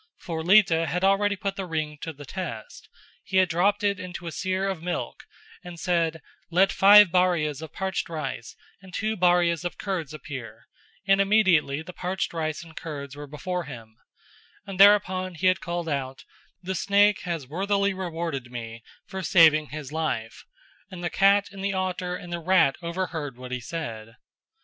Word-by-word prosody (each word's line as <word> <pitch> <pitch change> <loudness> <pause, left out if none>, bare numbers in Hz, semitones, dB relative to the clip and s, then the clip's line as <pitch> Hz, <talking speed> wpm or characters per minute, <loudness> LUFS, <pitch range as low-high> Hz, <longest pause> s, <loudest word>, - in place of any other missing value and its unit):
For 165 -2 -5
Lita 175 -2 +4
had 180 +3 -2
already 200 +1 +3
put 195 0 -4
the 190 -2 -4
ring 155 -2 -3
to 165 - -4
the 145 -1 -12
test: 145 - -7 0.3
he 190 - -2
had 185 -1 +4
dropped 200 +5 +1
it 200 -1 +1
into 180 -2 -7
a 170 - -4
seer 185 +3 -1
of 190 -4 -3
milk 175 +1 -4 0.4
and 175 -2 -9
said 165 -3 0 0.3
"Let 185 +3 +3
five 205 -1 +7
bharias 165 -5 +1
of 160 - -8
parched 190 -3 -3
rice 150 -7 -5 0.3
and 190 -1 -14
two 215 +1 -1
bharias 175 -2 +2
of 175 - -4
curds 185 -8 -3
appear" 140 -6 -9 0.4
and 195 0 +5
immediately 185 -8 +3
the 180 +2 -10
parched 185 0 -3
rice 155 -1 -3
and 165 -1 -15
curds 145 -3 -7
were 145 0 -8
before 175 +4 -4
him; 115 -5 -10 0.7
and 195 -2 -8
thereupon 185 -3 +5
he 180 - -4
had 185 -1 +3
called 170 -1 -4
out 135 -3 -4 0.4
"The 190 +2 -3
snake 200 +2 +3
has 170 -5 -3
worthily 200 +6 0
rewarded 165 -8 -4
me 115 -1 -7 0.2
for 190 - -6
saving 155 -3 +5
his 150 -2 -7
life;" 150 -9 -3 0.4
and 180 -2 -9
the 175 - -2
cat 200 +1 +4
and 195 -1 -8
the 200 0 0
otter 185 -1 -2
and 175 -1 -8
the 170 - -2
rat 165 -5 +3
overheard 170 -6 -4
what 125 0 -9
he 125 - -2
said. 115 -7 -6
175 Hz, 175 wpm, -25 LUFS, 155-190 Hz, 0.7 s, five